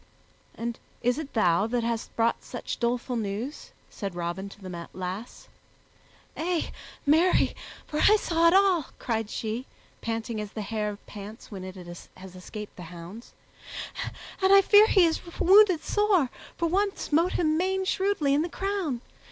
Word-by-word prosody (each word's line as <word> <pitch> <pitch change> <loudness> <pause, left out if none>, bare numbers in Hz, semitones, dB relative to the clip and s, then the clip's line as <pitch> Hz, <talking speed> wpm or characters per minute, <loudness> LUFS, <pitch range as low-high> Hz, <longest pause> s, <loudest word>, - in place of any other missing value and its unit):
"And 235 0 -4 0.2
is 245 +4 +2
it 300 -3 -7
thou 190 -2 +3
that 240 0 0
hast 230 -1 -3
brought 230 0 +1
such - - -5
doleful 245 +1 -1
news?" 225 +6 -4 0.2
said 195 -4 -5
Robin 175 +3 -3
to 200 - -14
the 180 -3 -7
lass. 185 +5 -6 0.9
"Ay, 345 +1 -1 0.3
marry, 320 +5 +4 0.3
for 300 - -3
I 425 - +7
saw 335 -5 +2
it 335 - +5
all," 380 -6 +4
cried 225 -3 -2
she, 225 +4 -3 0.3
panting 225 -1 -3
as 210 -1 -7
the 215 - -4
hare 210 -1 -2
pants 210 +3 -10
when 190 -3 -6
it 185 0 -7
has 180 +1 -11
escaped 210 +3 -8
the - - -8
hounds, 180 +7 -10 1.1
"and 380 0 +4
I 395 0 +8
fear 415 +2 +7
he 375 -5 +5
is 325 -1 0 0.2
wounded 380 -3 +6
sore, 400 - +2 0.3
for 335 - +1
one 395 +4 +1
smote 335 +4 +1
him 310 -3 +2
main 380 +3 0
shrewdly 380 -8 +1
i' 290 - +3
the 340 - -2
crown. 380 -11 -2
240 Hz, 160 wpm, -27 LUFS, 205-345 Hz, 1.1 s, I